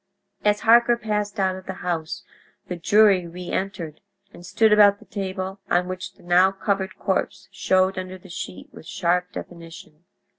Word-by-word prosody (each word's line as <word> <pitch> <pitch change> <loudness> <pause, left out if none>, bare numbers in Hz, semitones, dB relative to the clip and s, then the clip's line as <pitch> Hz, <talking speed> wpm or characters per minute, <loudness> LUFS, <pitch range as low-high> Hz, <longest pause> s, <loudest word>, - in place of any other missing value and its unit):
As 210 0 +2
Harker 235 +1 +5
passed 210 -2 -3
out 190 -1 +1
of 185 0 -11
the 190 - -3
house 165 -2 -3 0.4
the 180 - -4
jury 195 0 +4
reentered 175 -2 -5 0.3
and 175 - -13
stood 220 +4 +3
about 205 -1 +6
the - - -18
table 190 -1 -5
on 180 +1 +2
which 185 0 -6
the - - -22
now 180 +2 +4
covered 195 0 -2
corpse - - -2
showed 185 0 +1
under 185 0 -7
the 185 - -16
sheet 95 - -8
with 160 - -13
sharp 180 +1 0
definition. 165 -1 -11
185 Hz, 160 wpm, -23 LUFS, 175-200 Hz, 0.4 s, about